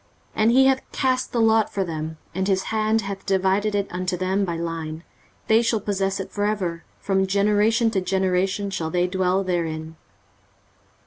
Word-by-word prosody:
23:034:017 - - -1
And 220 +2 +5
he 265 +1 +6
hath 265 0 +1
cast 255 -1 0
the 240 - -1
lot 220 -1 +3
for 195 - -1
them, 160 -2 -5 0.2
and 190 +2 -1
his 190 -1 +1
hand 220 0 +2
hath 200 -1 -6
divided 195 +2 +1
it 200 -1 0
unto 180 +1 -2
them 190 +2 0
by 170 -2 -3
line: 165 -1 -5 0.4
they 220 +1 +4
shall 230 -1 +1
possess 195 -1 -1
it 190 - -6
for 205 - -2
ever, 185 -5 -1 0.2
from 190 -1 0
generation 210 +3 +2
to 195 -4 0
generation 190 +1 0
shall 165 -4 -2
they 175 +2 +1
dwell 185 +1 +1
therein. 160 -3 -3
195 Hz, 180 wpm, -23 LUFS, 180-210 Hz, 0.4 s, he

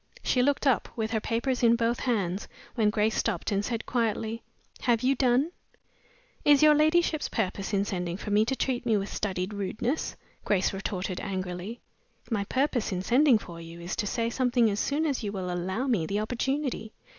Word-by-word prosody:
She 250 - +2
looked 285 +3 +1
up, 270 -4 +2
with 220 -1 -2
her 220 - +1
papers 235 +4 -1
in 235 -1 +5
both 235 0 0
hands, 200 -6 -1 0.3
when 220 -4 +2
Grace 215 +1 +1
stopped, - - -1
and 200 0 +1
said, 230 0 -3
quietly, 225 -1 -1 0.4
"Have 235 -2 +2
you 265 +2 +4
done?" 260 +4 +2 0.9
"Is 290 0 +6
your 305 0 +8
ladyship's 310 +1 +2
purpose 195 -2 -2
in 200 -1 +1
sending 180 -3 -3
for 205 - -6
me 210 +1 +5
to 265 - 0
treat 255 -2 -1
me 225 -3 +2
with 200 0 -4
studied 190 -1 -2
rudeness?" 215 +8 -2 0.3
Grace 190 -2 +1
retorted, 190 -1 -3
angrily. 190 +3 -4 0.5
"My 205 -3 0
purpose 260 -1 0
in 185 -1 -2
sending 255 +3 +5
for 170 -5 -9
you 165 +1 -10
is 170 +2 -4
to 205 - -1
say 230 +2 -1
something 245 -3 +2
as 200 - -2
soon 300 +3 0
as 280 -5 0
you 205 -3 -3
will 185 -3 -3
allow 190 +8 -2
me 215 -12 +1
the 200 +1 -1
opportunity." 245 0 -2
225 Hz, 190 wpm, -28 LUFS, 195-255 Hz, 0.9 s, your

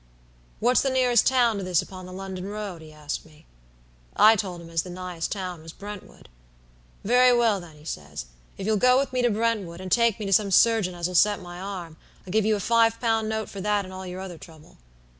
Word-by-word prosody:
"'What's 245 +3 +3
the 275 - 0
nearest 250 -3 +3
town 240 -4 +3
to - - -4
this 180 -3 +2
upon 185 -1 -10
the - - -10
London 190 0 -6
road?' 205 -4 -6
he 155 -1 -12
asked 150 -1 -5
me. 155 0 -20 0.7
"I 220 +1 +7
told 190 -5 -4
him 165 0 -12
as 165 -1 +1
the 180 - -10
nighest 180 -2 -5
town 185 -5 -4
was 165 0 -11
Brentwood. 205 -1 -10 0.8
"'Very 245 +3 +5
well, 225 -4 +3
then,' 170 -3 -12
he 150 - -17
says, 70 - -6 0.3
'if 190 - -5
you'll 215 0 +2
go 250 +4 +5
with 275 -1 -1
me 255 - +1
to 245 - +3
Brentwood, 210 -6 -1
and 185 -1 -7
take 235 -2 +3
me 210 - -4
to 195 - 0
some 205 0 +3
surgeon 200 -2 +3
as'll 175 +1 -3
set 205 +3 +4
my 175 -1 -9
arm, 180 -5 -7 0.3
I'll 185 - -8
give 215 +1 +2
you 215 0 +3
a - - -3
five 230 +2 +3
pound 225 -2 0
note 220 0 -2
for 195 - -8
that 205 0 0
and 185 - -10
all 185 0 -7
your 180 +1 -6
other 180 -4 -8
trouble.' 160 -2 -15
195 Hz, 230 wpm, -25 LUFS, 175-225 Hz, 0.8 s, I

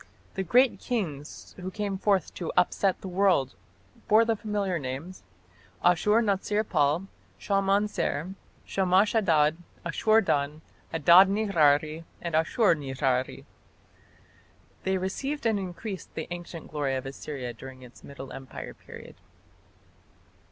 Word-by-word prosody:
The 190 - -2
great 245 +8 +3
kings 160 - -4
who 185 +1 -5
came 200 0 -3
forth 195 -3 +1
to 170 - -4
"upset 185 +1 +2
the - - -6
world" 185 -7 +2 0.5
bore 220 +2 +5
the 225 0 +1
familiar 205 -4 -2
names, 140 +7 -6 0.6
Ashur 210 +6 +4
natsir 210 +1 0
pal, 155 +3 +1 0.3
Shalmaneser, 195 -4 0 0.3
Shamash 190 +2 +2
Adad, 160 -8 +3 0.3
Ashur 215 +6 +3
dan, 150 -4 -1 0.3
Adad 170 +4 +7
nirari, 160 -6 +2 0.2
and 170 -2 -5
Ashur 170 +7 +3
nirari. 135 -3 -2 1.4
They 190 0 +1
revived 270 +10 -3
and 220 -3 +2
increased 190 0 -7
the 160 - -4
ancient 175 -2 -8
glory 145 -3 -1
of 130 - -4
Assyria 135 -2 -6
during 130 0 -11
its 125 -1 -15
Middle 135 -1 -9
Empire 135 -1 -8
period. - - -13
180 Hz, 120 wpm, -27 LUFS, 150-200 Hz, 1.4 s, Adad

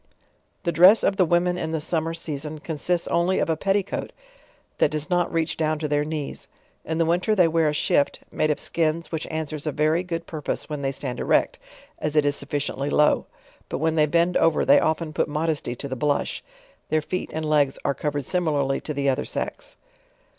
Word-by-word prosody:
The 170 - +1
dress 180 +7 +7
of 195 - +2
the 185 - +4
women 180 +1 +2
in 160 -1 -3
the 160 - 0
summer 165 +1 -2
season 155 -2 -5
consists 165 +3 -2
only 175 +2 +2
of - - +1
a - - +1
petticoat 195 +4 -1 0.7
that - - +4
does 155 +3 -4
not 175 -1 +2
reach 165 -1 -1
down 155 -1 0
to 150 0 -2
their 145 0 +1
knees. 150 -2 -5 0.4
In 160 - -3
the 165 - +2
winter 180 +6 +1
they 180 -4 +5
wear 165 -1 +2
a - - -1
shift, 145 -1 +1
rnaJe 155 - +1
of 150 - 0
skins 165 0 -1
which 160 -2 -3
an 160 0 -2
swers 155 0 -6
a - - +1
very 155 +4 +2
good 170 -2 -4
purpose 155 -3 -4
when 150 -2 -4
they 135 -1 0
stand 130 -2 -5
erect, - - +1 0.4
as 150 0 -2
it 150 -1 +4
is 145 0 +2
sufficiently 140 0 -3
low. 150 0 +3 0.4
but - - -2
when 160 +2 +1
they 155 -1 +3
bend 170 +3 +2
over 165 -1 +3
they 285 +1 +7
often 160 - -1
put - - +1
mod 155 +2 0
esty 145 -5 -4
to 140 - -6
the 130 - -4
blush. 145 +3 -1 0.5
.Their 155 -1 +1
feet 185 - -3
and 160 0 -3
legs 145 -3 +2
are 140 - +2
covered 145 0 -3
similarly 145 -6 0
to 150 - -5
the 140 0 0
other 135 +1 +1
sex. - - -5
155 Hz, 210 wpm, -24 LUFS, 150-170 Hz, 0.7 s, dress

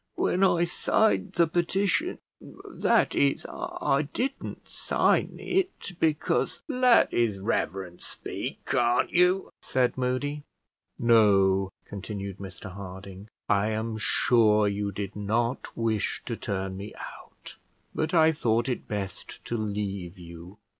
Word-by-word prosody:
When 185 - +1
I 175 -2 +4
signed 215 +5 +1
the 170 - +4
petition, 175 +4 0 0.2
that - - 0
is, 70 -1 +2
I 135 +1 -1
didn't 270 - -4
sign - - +1
it, 370 - -1
because 155 -1 +1
" - - -66 0.2
"Let 240 - +6
his 110 -5 +1
reverence 95 -3 -2
speak, - - -6
can't 120 0 +2
you?" 180 +2 +3
said 130 0 0
Moody. 130 +4 -1 0.6
"No," 100 -4 +4 0.2
continued 100 -1 -6
Mr 95 0 -8
Harding; 95 +1 -9 0.2
"I 100 0 +2
am 110 0 -2
sure 110 -1 +3
you 100 0 -1
did 100 +1 -5
not 115 +5 -1
wish 110 -2 -1
to - - -3
turn 95 -1 -3
me 100 +2 -8
out; - - -11 0.4
but 155 0 -1
I 160 -2 +5
thought 120 -5 +1
it 125 - -3
best 100 -3 -6
to 120 - -3
leave 100 -4 -3
you. 85 +2 -11
110 Hz, 125 wpm, -27 LUFS, 100-140 Hz, 0.6 s, Let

